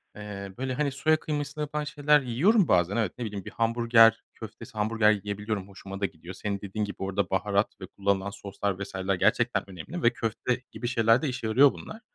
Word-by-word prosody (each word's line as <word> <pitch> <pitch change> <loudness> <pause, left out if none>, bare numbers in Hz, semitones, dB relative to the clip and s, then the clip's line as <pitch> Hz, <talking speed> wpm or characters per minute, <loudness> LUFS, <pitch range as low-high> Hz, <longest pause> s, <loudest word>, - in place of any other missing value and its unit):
eee, 100 -2 -7
böyle, 130 0 -2
hani, 140 +1 0
soya 155 +4 +2
kıymasıyla 150 -1 -4
yapılan 150 +1 -3
şeyler 150 0 +3
yiyorum 165 - +3
bazen, 90 +3 +2
evet, 110 -6 0
ne 120 - -4
bileyim, 100 -3 -6
bir - - -7
hamburger 115 -1 +4
köftesi, - - -10
hamburger 105 0 +3
yiyebiliyorum. 105 -1 -3
Hoşuma 100 0 -9
da - - +2
gidiyor. 85 0 -8
Senin 100 0 -3
dediğin 105 +2 -3
gibi, 100 - -7
orada 95 -1 -1
baharat 100 +2 +1
ve 95 - -5
kullanılan 100 0 -1
soslar 100 -1 -4
vs.ler 95 0 -2
gerçekten 90 - +1
önemli 95 - -7
ve 115 - +4
köfte 120 +2 -2
gibi 120 - -5
şeylerde 115 +4 +3
işe 125 -3 -4
yarıyor 130 +6 +5
bunlar. 220 - -10
110 Hz, 190 wpm, -27 LUFS, 100-130 Hz, -, yarıyor